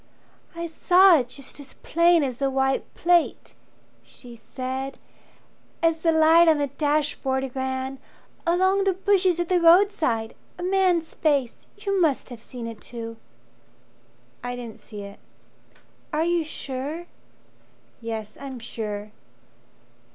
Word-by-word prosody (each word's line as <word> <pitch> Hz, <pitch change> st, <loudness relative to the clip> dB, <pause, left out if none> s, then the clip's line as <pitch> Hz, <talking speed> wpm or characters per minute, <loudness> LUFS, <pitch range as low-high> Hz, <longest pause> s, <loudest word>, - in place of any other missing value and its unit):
"I 335 Hz, 0 st, -4 dB
saw 355 Hz, +1 st, +5 dB
it 245 Hz, -, -3 dB
just 275 Hz, +2 st, -10 dB
as 275 Hz, -2 st, -11 dB
plain 335 Hz, 0 st, +3 dB
as 255 Hz, -1 st, -4 dB
a 275 Hz, -, +2 dB
white 265 Hz, 0 st, 0 dB
plate," 345 Hz, -1 st, +1 dB, 0.5 s
She 240 Hz, -2 st, -14 dB
said, 260 Hz, +3 st, -5 dB, 0.9 s
"as 330 Hz, -1 st, +3 dB
the 330 Hz, 0 st, +2 dB
light 320 Hz, +1 st, +6 dB
on 315 Hz, -2 st, +5 dB
the 290 Hz, -, +1 dB
dashboard 280 Hz, -2 st, -1 dB
ran 260 Hz, 0 st, -3 dB, 0.5 s
Along 375 Hz, +3 st, +3 dB
the 390 Hz, -1 st, +2 dB
bushes 375 Hz, -2 st, +2 dB
at 345 Hz, -, 0 dB
the 360 Hz, -1 st, +2 dB
roadside 330 Hz, -, +4 dB, 0.2 s
a 350 Hz, -, -6 dB
man's 365 Hz, -3 st, +1 dB
face. 280 Hz, -6 st, 0 dB
You 395 Hz, -2 st, -1 dB
must 300 Hz, -6 st, +1 dB
have 235 Hz, -2 st, -9 dB
seen 245 Hz, -1 st, -8 dB
it 230 Hz, -2 st, -8 dB
too." 230 Hz, -1 st, -7 dB, 1.3 s
"I 245 Hz, 0 st, -3 dB
didn't 235 Hz, -3 st, -8 dB
see 210 Hz, -3 st, -9 dB
it. 200 Hz, 0 st, -11 dB, 0.9 s
Are 310 Hz, +2 st, +1 dB
you 345 Hz, -1 st, +1 dB
sure 295 Hz, +2 st, -5 dB, 0.5 s
" -, -, -35 dB
"Yes, 220 Hz, -2 st, -6 dB
I'm 270 Hz, -2 st, -6 dB
sure!" 215 Hz, -3 st, -6 dB
285 Hz, 135 wpm, -24 LUFS, 250-340 Hz, 1.3 s, light